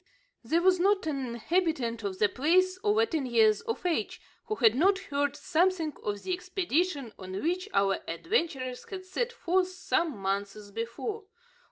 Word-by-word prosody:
There 335 +2 +1
was 370 -1 +4
not 390 +1 +3
an 275 -4 -2
inhabitant 240 -2 -1
of 195 -2 -3
the 210 - +4
place 370 - +2
over 430 +1 +3
ten 315 - -2
years 220 -3 +4
of 455 -5 -4
age 360 +1 -1 0.3
who 430 -2 -2
had 225 - +5
not 375 +10 +4
heard 285 -5 -1
something 330 0 +1
of 205 -1 -3
the 370 - -1
expedition 355 - -1
on 190 0 -5
which 365 +5 -1
our 195 -1 +2
adventurers 265 - -2
had 375 -2 -6
set 480 +6 -2
forth 370 -5 +1
some 345 - -1
months 200 +1 -3
before. 235 - -4
325 Hz, 160 wpm, -29 LUFS, 230-370 Hz, 0.3 s, had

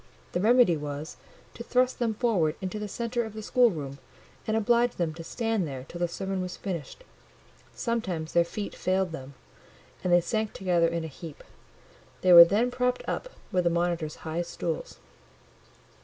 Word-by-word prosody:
The - - -1
remedy 235 -4 +5
was, 150 +1 -6 0.4
to 235 - -8
thrust 250 +1 +1
them 230 -3 0
forward 195 -10 +1
into 190 +2 -4
the 210 - -4
centre 235 +3 -2
of 220 -2 -7
the 215 - -6
schoolroom, 160 - +1 0.5
and 220 0 +1
oblige 235 +2 +3
them 165 -3 -1
to 165 +1 -8
stand 225 -1 -1
there 135 -2 -6
till 175 - -8
the 175 - +1
sermon 190 +2 -3
was 180 0 -5
finished. 185 - -6 0.7
Sometimes 185 -9 -2
their 170 - +5
feet 200 +4 -5
failed 185 -1 0
them, 135 -3 -8 0.7
and 180 - 0
they 175 - +7
sank 215 +4 -2
together 175 -3 +2
in 170 0 -2
a - - -4
heap; 155 +1 -10 0.8
they 185 -1 +5
were 170 0 +13
then 220 +8 +1
propped 250 0 0
up - - -3 0.2
with 180 -1 +2
the 170 - +3
monitors' 170 -2 -1
high 160 +2 -1
stools. 170 -1 -4
180 Hz, 170 wpm, -28 LUFS, 165-225 Hz, 0.8 s, were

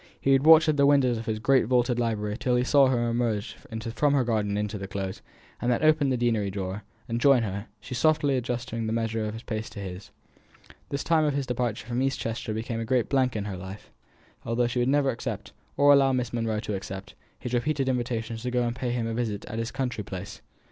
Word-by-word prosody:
He 135 - +1
would 135 +3 +4
watch 160 0 +8
at 155 -1 +2
the 140 0 +5
windows 130 -5 +3
of 115 - -8
his 110 -1 -1
great 130 +4 +3
vaulted 125 0 +2
library 105 -3 -1
till 125 +1 0
he 125 - +2
saw 140 +1 +5
her 120 -2 +1
emerge 115 -2 -1
from 110 - -9 0.4
the 135 -2 +3
garden 105 -4 0
into 105 0 -2
the 95 - -5
Close, 95 -1 -5 0.4
and 120 - +1
then 120 - 0
open 155 -2 +4
the 130 - +1
deanery 115 -4 +1
door, 95 +1 -4 0.3
and 115 +1 -2
join 135 -4 +5
her, 100 0 -4
she 105 - -8
softly 145 +1 +2
adjusting 120 -2 -3
the 110 - -1
measure 115 -1 -1
of 105 +1 -4
her - - -6
pace 110 -1 -4
to - - -9
his. 95 +1 -7 0.8
The 140 - -2
time 160 +2 +2
of 145 -2 +1
his 140 -1 -1
departure 120 -3 -2
from 120 +1 -2
East 135 0 0
Chester 115 -1 -3
became 115 +1 -3
a - - -2
great 120 0 +1
blank 130 -3 +2
in 105 -2 -2
her 100 -3 -4
life, 95 +2 -9 0.5
although 115 +1 0
she 120 +1 -1
would 120 - +2
never 140 -1 +3
accept, 110 -4 -5 0.3
or 145 0 +7
allow 135 -1 +4
Miss 125 -2 -1
Monro 115 -2 -1
to 105 - -4
accept, 95 +1 -6 0.2
his 125 -1 -6
repeated 135 +2 0
invitations 120 -3 -2
to 125 - -2
go 125 0 +1
and 120 0 -2
pay 125 0 -3
him 120 -1 -1
a 115 - -2
visit 110 -4 -2
at 110 - -5
his 115 0 -2
country 125 -5 -3
place. 95 +1 -7
120 Hz, 235 wpm, -27 LUFS, 110-130 Hz, 0.8 s, watch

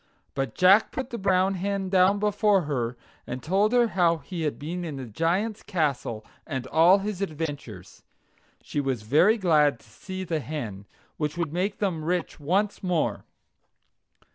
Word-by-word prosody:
But 135 0 -3
Jack 195 +4 +5
put 265 0 -5
the 235 - -4
brown 190 0 +2
hen 195 +1 -2
down 190 +1 +4
before 205 -2 +2
her, 125 -5 -2 0.3
and 125 +1 -5
told 195 +6 +2
her 240 -2 +4
how 170 -4 +2
he 170 +2 -7
had 150 -2 -1
been 170 +5 -5
in 160 -4 -5
the 135 -1 -6
Giant's 175 - -1
castle, 140 - -2 0.2
and 130 -5 -3
all 165 +8 +5
his 200 -1 -4
adventures. 145 - -6 0.6
She 145 - -2
was 130 -5 -2
very 155 - +4
glad 150 - +3
to - - -21
see 190 -1 -7
the 165 -3 -2
hen, 115 -9 -6 0.3
which 150 +1 -2
would 165 -3 -2
make 195 +4 -1
them 180 -6 -1
rich 175 +1 -2
once 195 +8 0
more. 180 -4 -1
170 Hz, 165 wpm, -26 LUFS, 145-195 Hz, 0.6 s, Jack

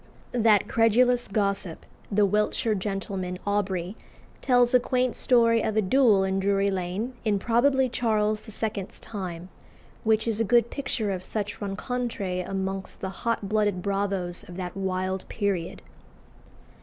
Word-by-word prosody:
That 225 -4 +3
credulous 240 +2 +3
gossip, 200 -4 -2 0.3
the 205 0 +4
Wiltshire 210 +3 +1
gentleman, 195 -2 -3
Aubrey, 195 -2 -1 0.5
tells 245 -2 +4
a 250 - +7
quaint 250 0 0
story 230 -2 +3
of 220 - -1
a - - +5
duel 215 -2 +4
in 190 0 0
Drury 200 0 +2
Lane, 190 +6 -3
in 210 -3 +2
probably 260 +5 +2
Charles 215 -3 0 0.2
II.'s 200 -3 -3
time, 185 -5 -6 0.5
which 220 0 +2
is 225 -1 0
a - - +3
good 235 +1 +3
picture 230 -7 -2
of 185 -1 -4
such 205 +1 -4
rencontres 200 -2 -3
amongst 195 0 -4
the 190 - -2
hot 225 +1 -2
blooded 205 -3 0
bravos 195 -3 -1
of 175 - -9
that 180 -1 -5
wild 185 -1 -2
period. 195 -5 -2
205 Hz, 140 wpm, -26 LUFS, 190-230 Hz, 0.5 s, a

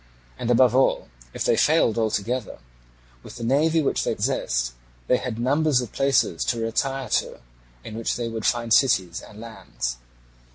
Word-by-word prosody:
And 120 - -3
above 120 0 +5
all 130 - +2 0.2
if - - -4
they - - +3
failed 150 -7 +3
altogether, 115 +1 -2 0.6
with - - -12
the 120 - -7
navy 155 +6 +2
which - - 0
they - - -1
possessed, - - -1 0.3
they 125 - +3
had 120 -3 -5
numbers 140 +3 +2
of 125 -4 -5
places 135 -1 +1
to 120 - -1
retire 135 +4 -2
to - - -1 0.4
in 110 - -8
which 115 0 -2
they 120 -1 -3
would 115 -1 -5
find 115 -1 +1
cities 95 -11 +2
and 105 - -13
lands. 110 - -5
120 Hz, 165 wpm, -24 LUFS, 110-135 Hz, 0.6 s, above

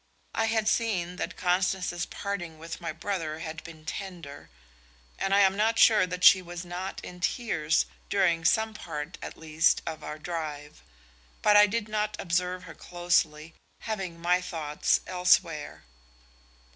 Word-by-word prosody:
I 225 - +1
had 220 -1 0
seen 185 -6 0
that - - -4
Constance's 180 -1 0
parting 180 -5 -5
with 165 +2 -8
my 165 -1 -3
brother 165 -2 -3
had 160 -1 -7
been 160 -2 -12
tender, 170 -4 -7 0.7
and 195 - -1
I 200 +1 +5
am 190 -1 +4
not 220 +2 +2
sure 210 -5 +6
that 180 0 -5
she 190 -1 +9
was 175 0 -7
not 180 +2 -5
in 180 - -9
tears 170 -5 +1 0.2
during 175 -5 +2
some 220 +5 +2
part 165 -4 -6
at - - -7
least 160 +1 +2
of 160 -1 -5
our 150 - -6
drive; 150 -3 -6 0.6
but 210 - +5
I 210 0 +8
did 215 +1 -2
not 215 0 -1
observe 180 +1 -1
her 170 -2 -10
closely, 165 -2 0 0.3
having 195 -6 -4
my 180 +2 +2
thoughts 160 -4 0
elsewhere. 180 -4 +1
180 Hz, 150 wpm, -28 LUFS, 165-195 Hz, 0.7 s, she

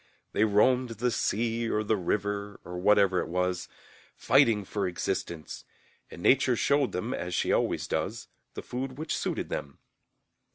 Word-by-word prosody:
They 110 - +3
roamed 115 +3 +2
the 125 +2 +1
sea 115 +1 0
or 105 - 0
the 110 +1 +1
river, 100 +1 -2
or 90 0 -6
whatever 100 -1 +4
it - - -2
was, 90 +1 -1 0.5
fighting 105 -3 +3
for 100 +1 -2
existence, 85 -2 -4 0.5
and 85 - -10
Nature 130 -1 +4
showed 140 +3 +2
them, 110 +8 -3
as 90 0 -3
she - - +1
always - - 0
does, - - -3 0.3
the - - -6
food 130 +1 -5
which 155 +1 -2
suited - - -2
them. 70 - -5
105 Hz, 155 wpm, -28 LUFS, 90-120 Hz, 0.5 s, whatever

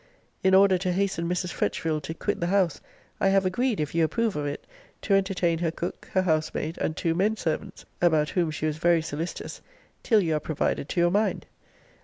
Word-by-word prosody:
In 190 0 +5
order 190 -1 +5
to 185 0 -1
hasten 185 -3 -1
Mrs. 180 0 -2
Fretchville 155 -2 -1
to 160 +3 -6
quit - - -2
the 170 - -1
house, 185 -3 +1 0.4
I - - +2
have 195 0 +3
agreed, 235 +5 0
if 150 -1 -2
you 165 0 +2
approve 225 +6 0
of 145 -1 -2
it, 145 - -5 0.4
to 200 - +1
entertain 185 -4 +1
her 170 -1 0
cook, 170 +2 -6
her 185 - +3
housemaid, 160 -1 -1
and 155 - -2
two 165 - 0
men 205 +6 +1
servants, 180 +3 -4 0.2
(about 155 -4 +3
whom 175 -3 0
she 155 0 -3
was 155 -1 -1
very 170 -1 +3
solicitous,) 160 +3 -5 0.4
till 220 -3 +4
you 165 -4 0
are - - -2
provided 150 -2 -2
to - - -1
your 175 0 +4
mind. 210 +3 0
175 Hz, 205 wpm, -26 LUFS, 160-195 Hz, 0.4 s, In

